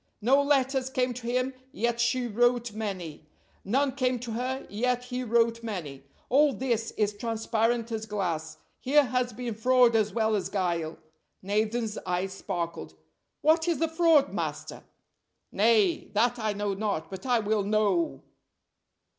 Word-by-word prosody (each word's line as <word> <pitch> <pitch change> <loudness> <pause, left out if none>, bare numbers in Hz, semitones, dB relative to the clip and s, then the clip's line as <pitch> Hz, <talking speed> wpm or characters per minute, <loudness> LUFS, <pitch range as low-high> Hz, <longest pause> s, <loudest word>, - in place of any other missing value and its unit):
No 265 +6 +4
letters 270 -2 +1
came 255 -1 0
to 240 -1 -7
him, 255 +2 0 0.2
yet 235 +1 -1
she 235 +1 +1
wrote 240 0 +1
many. 180 -8 -6 0.3
None 270 +7 +1
came 255 -1 0
to 240 -2 -5
her, 255 +4 -3
yet 245 +4 -1
he 250 0 -4
wrote 230 0 +2
many. 160 -12 -6 0.2
All 285 +2 +4
this 235 -4 -1
is 210 -1 +1
transparent 230 +1 -1
as 220 -1 -4
glass 165 -7 -3 0.2
here 290 +3 +4
has 250 0 -1
been 240 +1 -5
fraud 245 +1 +4
as 215 -1 +2
well 220 -1 +1
as 200 - -2
guile." 170 -4 -2 0.5
Nathan's 215 +2 -1
eye 180 +1 -1
sparkled. 170 - -5 0.5
"What 320 +2 +3
is 340 - +1
the 325 - +1
fraud, 320 -3 +3
master?" - - -4 0.7
"Nay, 210 -4 +2
that 240 +3 +2
I 215 -2 -1
know 205 0 -2
not, 195 -5 -3
but 190 +7 -7
I 245 -1 +3
will 215 -1 0
know!" 215 - 0
230 Hz, 150 wpm, -28 LUFS, 205-250 Hz, 0.7 s, No